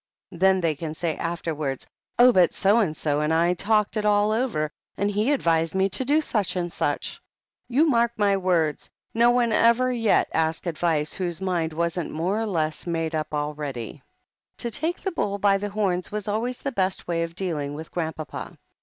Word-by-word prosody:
Then 190 +1 +3
they 165 -2 +1
can 155 +1 -6
say 165 -1 -2
afterwards 155 -5 -3 0.3
'Oh, 250 +1 +8
but 180 -6 +4
so 205 +4 +3
and 165 -9 0
so 150 -1 0
and 150 +1 0
I 170 +2 +3
talked 210 +3 +1
it 215 - 0
all 210 0 +3
over 215 -10 0 0.3
and 200 +1 0
he 210 +7 +1
advised 165 - +1
me 190 +1 +2
to 200 +7 -2
do 290 +4 +3
such 205 - -1
and 175 -2 -2
such.' - - -2 0.5
You 285 +7 +3
mark 235 -4 +3
my 200 -2 +3
word, 175 -5 +1 0.3
no 235 +1 +4
one 240 -2 +2
ever 235 +3 +4
yet 230 -3 +2
asked 160 +1 0
advice 160 -3 0
whose 175 -3 -2
mind 175 -4 -1
wasn't 170 +1 -1
more 185 +7 -1
or 225 - -1
less 160 -4 -2
made 165 -1 -1
up 155 -1 -2
already." 145 -5 -4 0.6
To 235 - -2
take 325 +9 -2
the 385 - -3
bull 200 - -1
by 200 -1 +3
the 205 +1 -3
horns 195 -4 -1
was 210 -1 -4
always 230 +4 -1
the 275 - -1
best 190 -5 -1
way 170 -1 0
of 165 0 -4
dealing 155 -6 -3
with 160 +1 -8
Grandpapa. 160 -4 -5
185 Hz, 190 wpm, -25 LUFS, 160-215 Hz, 0.6 s, Oh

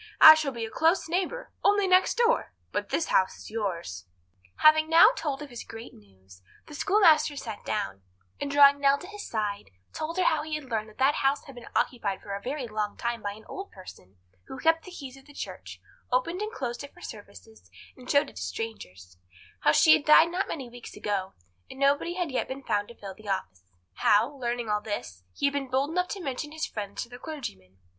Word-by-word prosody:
I 315 - +12
shall 310 -3 -1
be 235 -3 -4
a 220 - -9
close 330 +3 +2
neighbour—only 405 +2 0
next 370 0 +4
door; 475 +1 +2 0.2
but - - -3
this 330 - -1
house 190 0 +2
is - - -11
yours." 170 - -4 0.5
Having 310 0 +6
now 330 +8 +8
told 290 - -3
his 260 -5 -8
great 225 +1 -10
news, 95 -2 -19 0.2
the - - -12
schoolmaster 320 -4 +4
sat 225 -7 -6
down, 95 0 -3 0.4
and 285 - -3
drawing 280 0 +6
Nell 280 0 +4
to 360 - -10
his 410 +1 -8
side, 205 - -3 0.2
told 320 +3 -4
her 370 - +3
how 315 - +2
he 310 0 -4
had 305 - -5
learned 220 -1 -2
that 215 - -19
that 270 +2 +4
house 275 0 +1
had 275 - -12
been 245 -1 -12
occupied 205 -6 0
for 200 - -6
a 200 - -4
very 260 +2 -4
long 215 -1 -3
time 235 -1 -2
by 205 0 -3
an 215 +1 -15
old 390 +1 -7
person, 100 - -14 0.3
who - - -8
kept 325 +4 +2
the 370 - -10
keys 275 -6 -9
of 270 - -17
the 290 - -16
church, - - -8 0.3
opened 335 +10 0
and 425 +1 -3
closed 245 - -4
it 285 - -11
for 350 - -16
the - - -7
services, 100 - -12 0.3
and 250 -1 -13
showed 285 0 +4
it - - -13
to - - -6
strangers; 90 - -7 0.4
how 150 - +4
she 310 - +6
had - - +3
died 310 +2 +6
not 365 +3 -1
many 270 -5 -5
weeks 240 0 -11
ago, 195 -2 -3 0.3
and 265 - -11
nobody 285 +5 +2
had 355 -5 -2
yet 260 - -1
been 270 +1 -7
found 205 -3 0
to 235 - -13
fill 195 -2 -8
the 210 +2 -11
office; 95 - -3 0.4
how, 210 +2 +4
learning 240 -3 -3
all 210 0 0
this, 205 - -5
he - - -1
had 280 - +2
been 275 -2 -3
bold 270 +4 0
enough 360 +1 0
to 400 - -5
mention 295 -2 -4
his 315 0 -3
friends 205 -2 -5
to - - -12
the 245 +1 -11
clergyman. 95 - -8
260 Hz, 220 wpm, -27 LUFS, 205-310 Hz, 0.5 s, I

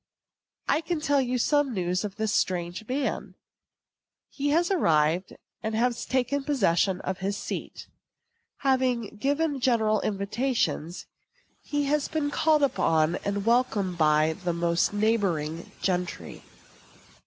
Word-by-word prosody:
I - - +2
can 335 0 -2
tell 285 -2 +2
you 250 -1 -1
some 285 0 +1
news 180 +1 -1
of 200 -2 -5
this 220 -1 -1
strange 180 +3 -1
man. 265 +2 -2 1.0
He 285 0 -2
has 340 +5 +2
arrived, 165 - +2 0.3
and 220 0 -2 0.3
taken 260 +2 0
possession 195 - +1
of 185 0 -4
his 200 +2 -2
seat. - - -6 0.8
Having 255 -5 0
given 285 +4 0
general 220 -4 +2
invitations, 200 - -1 0.6
he 290 -1 -2
has 290 0 +1
been 300 -2 -2
called 305 0 +3
upon 165 - +2
and 200 0 -3
welcomed 220 -7 +1
by 155 0 +3
most 170 -1 +1
of - - -8
the 205 - -1
neighboring 170 -8 -1
gentry. 180 -2 -2
215 Hz, 125 wpm, -27 LUFS, 180-275 Hz, 1.0 s, called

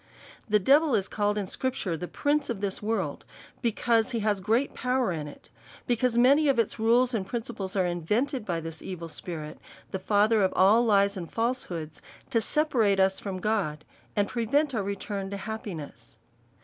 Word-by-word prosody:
The 210 - +5
devil 275 - +4
is 195 -3 0
called 210 0 0
in 205 - -1
scripture 220 -4 -2
the 180 +2 -5
prince 290 +5 0
of 235 -4 -2
this 200 -1 -2
world, 220 +2 -2 0.4
because 230 -1 +1
he 230 - -2
has 205 -2 0
great 225 +8 +1
power 250 -4 0
in 155 -3 -4
i*:, 145 - -10 0.5
because 240 0 +1
ma 250 +3 +7
ny 300 +1 +2
of 275 -3 +3
its 230 -2 0
rules 240 +3 +3
and 215 -4 0
principles 210 -2 -4
are 190 -2 +2
invented 210 - -1
by 170 -5 -2
this 165 0 -7
evil 170 -3 -6
spirit, 155 -2 -7 0.3
the 190 - -3
father 210 +3 +3
of 190 - +2
all 205 +5 +5
lies 200 -3 +3
and 170 -3 -6
falsehood, 185 -10 -3 0.3
to 230 -3 +2
se 300 +6 +2
parate 220 -10 +2
us 190 0 +3
from 190 -2 -5
God, 180 -8 -1 0.3
and 205 -1 +2
prevent 275 +7 0
our 220 - 0
return 200 0 -4
to 200 - -4
hap 220 +2 -6
piness. 145 - -8
210 Hz, 190 wpm, -27 LUFS, 190-240 Hz, 0.5 s, ma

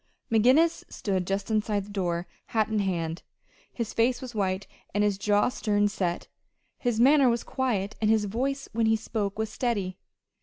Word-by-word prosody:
McGinnis 255 +9 +4
stood 190 -3 -2
just 195 +2 -2
inside 210 -2 0
the 205 - -12
door, 175 -3 -1 0.2
hat 220 -1 +1
in 215 -1 0
hand. 170 -4 -1 0.5
His 230 -3 -4
face 240 +2 +2
was 255 -2 -8
white, 195 -2 -1 0.3
and 205 - +3
his 205 -2 +1
jaw 205 +2 +3
stern 205 -4 +1
set. 180 -4 -2 0.5
His 240 -3 0
manner 270 +1 +6
was 235 0 0
quiet, 220 -6 -1
and 215 - +2
his 220 -1 +3
voice 270 +7 -2
when 225 0 +2
he 220 - +4
spoke 215 -2 -3
was 220 -1 -2
steady. 205 -7 -2
215 Hz, 175 wpm, -27 LUFS, 195-235 Hz, 0.5 s, manner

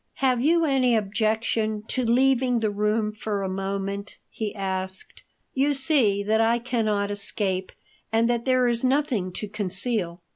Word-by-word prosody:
"Have 255 -3 +1
you 330 +4 +3
any 260 -4 +3
objection 215 0 0
to 255 - 0
leaving 250 +1 +3
the 215 -2 0
room 210 +1 0
for 210 -1 -3
a - - -1
moment?" 195 +1 -4
he 215 -2 -3
asked. 190 -1 -4 0.3
"You 280 +2 +2
see 260 -8 +2
that 220 +2 +2
I 230 +1 +3
cannot 220 -4 -1
escape 195 -2 -2 0.4
and 225 +1 +3
that 235 -1 0
there 255 -1 +3
is 235 0 +1
nothing 255 -8 +1
to 210 - -5
conceal." 195 -3 -2
220 Hz, 150 wpm, -25 LUFS, 200-250 Hz, 0.4 s, you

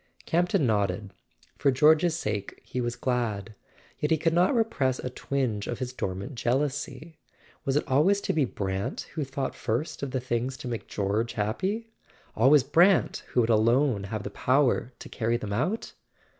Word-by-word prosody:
Campton 175 -1 +2
nodded. 100 -3 0 0.5
For 140 - +3
George's 155 +5 +4
sake 105 - -4
he 125 - -4
was 120 0 -2
glad; 115 -5 -2 0.5
yet 150 - 0
he 160 - +3
could 165 +1 +1
not 180 +9 +3
repress 145 - +1
a 125 - -5
twinge 125 -6 -2
of 120 - -3
his 125 0 -4
dormant 100 +3 -4
jeal¬ 120 +1 +1
ousy. 145 +3 -6 0.5
Was 135 - 0
it 150 - +2
always 155 +10 +3
to - - -1
be 155 - +2
Brant 95 -5 -3
who 155 - -2
thought 135 0 -3
first 120 +8 -3
of 140 - -2
the 130 - -1
things 125 +1 -2
to - - -7
make 115 -2 -4
George 105 +3 -1
happy—always 145 - 0
Brant 170 +7 +4
who 125 - +2
would 115 0 +2
alone 115 0 +3
have 105 +1 -4
the 100 - -5
power 130 +1 +2
to - - -10
carry 115 +1 -1
them 105 -4 -5
out? 180 - -1
130 Hz, 170 wpm, -27 LUFS, 110-150 Hz, 0.5 s, George's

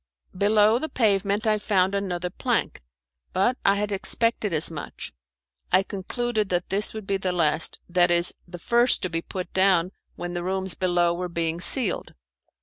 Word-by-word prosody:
Below 210 +3 +3
the 315 - -4
pavement 205 -2 +1
I 215 -1 +2
found 195 -2 +1
another 180 -3 -3
plank, - - -2 0.5
but 240 +7 +2
I 200 - +4
had 205 +1 -2
expected 215 +2 0
as 160 0 0
much. 150 -3 -7 0.6
I 185 +1 +4
concluded 215 +2 -3
that 180 0 -1
this 200 +2 +1
would 220 -2 -8
be 195 0 0
the 190 -1 -2
last; 165 -2 +1
that 175 0 +3
is 175 0 +3
the 175 0 -9
first 240 +6 +3
to 185 - -2
be 165 0 -1
put 180 0 -7
down 185 -2 +3 0.2
when 175 0 -6
the 175 - -3
rooms 190 0 -1
below 175 -2 +1
were 180 +1 -4
being 170 -1 -2
ceiled. 245 +1 +2
190 Hz, 170 wpm, -24 LUFS, 175-210 Hz, 0.6 s, I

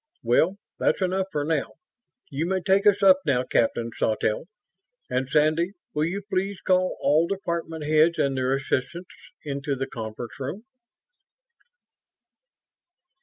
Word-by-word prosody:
"Well, 170 +11 +3 0.2
that's - - +2
enough 190 +1 0
for 150 -3 -1
now. 155 -3 -1 0.6
You 145 +4 -1
may 190 0 0
take 195 +3 +3
us 200 0 +4
up 190 -1 +7
now, 135 -5 +1
Captain 115 -1 0
Sawtelle. 110 +2 0 0.7
And 130 +1 -1
Sandy, 155 +5 +2 0.2
will 150 +1 +1
you 195 +5 -3
please 195 0 -2
call 185 0 +1
all 155 +3 +3
department 170 -5 -3
heads 155 +2 +4
and 135 -1 +1
their 130 +1 +1
assistants 140 +6 -3 0.3
into 140 0 -2
the 135 0 -2
conference 115 -1 -7
room?" 145 +11 -5
155 Hz, 130 wpm, -25 LUFS, 135-185 Hz, 0.7 s, up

